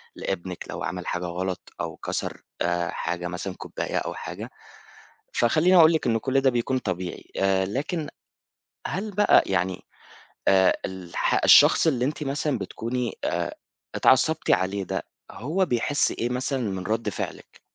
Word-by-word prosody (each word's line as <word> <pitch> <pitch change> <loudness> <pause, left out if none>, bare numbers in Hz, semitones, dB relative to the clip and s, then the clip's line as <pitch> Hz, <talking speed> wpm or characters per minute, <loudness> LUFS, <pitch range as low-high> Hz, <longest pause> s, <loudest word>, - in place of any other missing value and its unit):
لإبنِك 90 -1 -4
لو - - -5
عمل 90 +1 -4
حاجة 90 0 -2
غلط 90 +1 -4
أو - - -4
كسر - - -4 0.2
آآ، 85 0 0
حاجة 85 +1 -3
مثلًا 90 +2 -4
كوباية - - -4
أو - - -2
حاجة. - - -7 0.8
فخلّيني 160 +10 +4
اقول 165 -1 +8
لِك 160 - 0
إن 115 -1 +2
كُلّ 135 +4 +1
ده 135 - +4
بيكون 125 +1 0
طبيعي 95 -5 -5
آآ، 95 -1 +2
لكن 145 - -3 0.8
هل 195 +9 -3
بقى 205 +2 +5
يعني 95 -1 -1 0.7
آآ، 95 -1 +5
الح 95 -2 -1
الشخص - - +7
اللي 125 -5 +2
أنتِ 150 +1 -2
مثلًا 140 0 -1
بتكوني 115 +4 -3
آآ، - - -1 0.4
اتعصبتِ 150 +5 +3
عليه 95 +1 +1
ده - - -3 0.3
هو 165 - -1
بيحس 135 +2 +1
إيه 120 - -2
مثلًا 130 +2 -1
من 95 -4 -3
رَد 110 0 -1
فعلِك؟ - - -7
115 Hz, 150 wpm, -25 LUFS, 95-140 Hz, 0.8 s, اقول